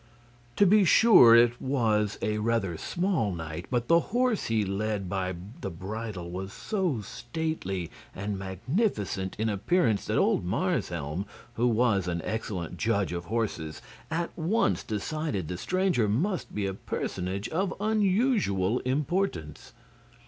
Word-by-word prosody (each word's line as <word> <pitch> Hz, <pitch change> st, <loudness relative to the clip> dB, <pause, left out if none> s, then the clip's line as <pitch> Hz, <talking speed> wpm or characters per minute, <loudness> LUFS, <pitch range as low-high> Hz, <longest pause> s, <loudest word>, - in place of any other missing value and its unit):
To 205 Hz, -, +5 dB
be 205 Hz, +2 st, +6 dB
sure 180 Hz, -, +8 dB
it 120 Hz, +1 st, +4 dB
was 110 Hz, -6 st, +1 dB
a 105 Hz, 0 st, 0 dB
rather 105 Hz, -5 st, 0 dB
small 170 Hz, -, -1 dB
knight, 80 Hz, 0 st, -6 dB
but 120 Hz, -2 st, 0 dB
the 170 Hz, 0 st, +6 dB
horse 245 Hz, -1 st, +1 dB
he 110 Hz, -2 st, +1 dB
led 100 Hz, 0 st, -2 dB
by 95 Hz, 0 st, -2 dB, 0.3 s
the 100 Hz, -, -3 dB
bridle 95 Hz, 0 st, -6 dB
was 95 Hz, +2 st, -5 dB
so 185 Hz, -, -1 dB
stately 120 Hz, -, -4 dB, 0.2 s
and 100 Hz, 0 st, -3 dB
magnificent 100 Hz, -, -2 dB
in 110 Hz, -, 0 dB
appearance 110 Hz, -, +1 dB
that -, -, 0 dB
old -, -, +2 dB
Marshelm, 90 Hz, -, -2 dB, 0.3 s
who 120 Hz, +2 st, +1 dB
was 110 Hz, -5 st, +2 dB
an 85 Hz, -1 st, -2 dB
excellent 95 Hz, -6 st, -4 dB
judge 100 Hz, -4 st, 0 dB
of 85 Hz, 0 st, -4 dB
horses, 100 Hz, -8 st, -2 dB, 0.3 s
at 165 Hz, +1 st, -2 dB
once 165 Hz, -, +1 dB
decided 110 Hz, -, -3 dB
the 90 Hz, -, -4 dB
stranger 185 Hz, -, +1 dB
must 175 Hz, -, -1 dB
be 105 Hz, -1 st, -1 dB
a 95 Hz, -, -2 dB
personage 95 Hz, +1 st, -3 dB
of 185 Hz, +4 st, 0 dB
unusual 200 Hz, -, +2 dB
importance. 140 Hz, -, -2 dB
110 Hz, 135 wpm, -28 LUFS, -, 0.3 s, sure